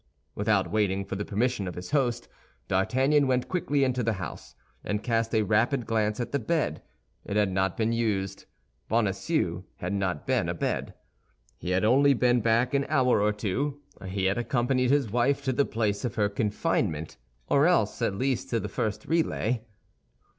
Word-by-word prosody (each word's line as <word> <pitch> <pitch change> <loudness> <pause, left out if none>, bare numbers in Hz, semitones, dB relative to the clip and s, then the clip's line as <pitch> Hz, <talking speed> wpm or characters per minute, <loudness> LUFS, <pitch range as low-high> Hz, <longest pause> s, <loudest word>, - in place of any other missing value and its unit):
Without 105 -2 +1
waiting 100 -2 +1
for - - -5
the 100 - -2
permission 110 0 -1
of 90 - -5
his 90 +5 -7
host, 125 -5 0 0.4
D'Artagnan 130 +9 +2
went 125 -1 +1
quickly 145 -6 0
into 130 -1 +1
the 115 -1 +1
house, 90 -7 -7 0.3
and 105 +1 -2
cast 115 -1 0
a 110 - +3
rapid 115 +5 +1
glance 110 -1 0
at 120 - -3
the 140 - 0
bed. 155 - -1 0.4
It 100 - -5
had 105 -2 +2
not 95 -1 0
been 115 0 +1
used. 105 -5 -1 0.4
Bonacieux 95 - 0
had 90 +3 -3
not 95 -6 -2
been - - +1
abed. - - -2 0.6
He - - -5
had 90 +3 +2
only 140 +4 +5
been 125 0 +3
back 115 +3 +2
an 140 0 +1
hour 130 -7 +3
or 105 +1 +3
two; 125 +8 -2 0.3
he 95 0 -2
had 95 +4 +1
accompanied 125 +2 +1
his 140 -6 +2
wife 135 +4 +1
to 130 -1 0
the 140 +3 +2
place 105 -2 -1
of 120 -4 -3
her 105 -2 +2
confinement, 100 - -1 0.3
or 140 +3 +4
else 170 - +1
at 95 - 0
least 130 +4 -1
to 115 - 0
the 105 - -4
first 105 +1 -3
relay. 125 -8 0
115 Hz, 175 wpm, -27 LUFS, 100-130 Hz, 0.6 s, only